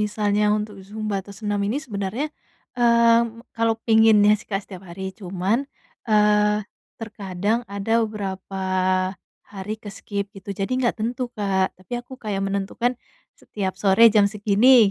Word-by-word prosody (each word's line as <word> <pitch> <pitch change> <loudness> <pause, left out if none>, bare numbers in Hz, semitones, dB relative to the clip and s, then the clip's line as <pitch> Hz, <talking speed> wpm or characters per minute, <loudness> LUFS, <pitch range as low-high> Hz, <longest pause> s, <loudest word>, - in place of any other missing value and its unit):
misalnya 210 0 0
untuk 210 -1 -5
zumba 215 0 -4
atau 200 - -11
senam 205 -2 -2
ini 230 +7 -1
sebenarnya, 210 +5 -3 0.5
mmm, 235 -1 +3
kalau 225 0 +2
pinginnya 220 -2 +6
sih, - - -14
Kak, 195 0 0
setiap 185 -1 -9
hari. 190 +2 -8 0.2
Cuman, 190 +3 -1 0.5
eee, 210 0 +4 0.4
terkadang 205 -1 -2
ada 200 +2 -2 0.2
berapa 195 -2 -5 0.9
hari 200 +1 -6
ke-skip 200 0 -5
gitu, 195 +1 -12
jadi 195 +1 -3 0.2
gak - - +1
tentu, 240 +3 -2
Kak. 190 -2 0
Tapi 185 +6 -16
aku 245 +2 -17
kayak 200 -3 -2
menentukan, 200 +5 -1 0.5
setiap 190 -2 -4
sore 195 +3 +3
jam 205 -2 +5
segini, 210 +2 +5
210 Hz, 135 wpm, -23 LUFS, 195-225 Hz, 0.9 s, pinginnya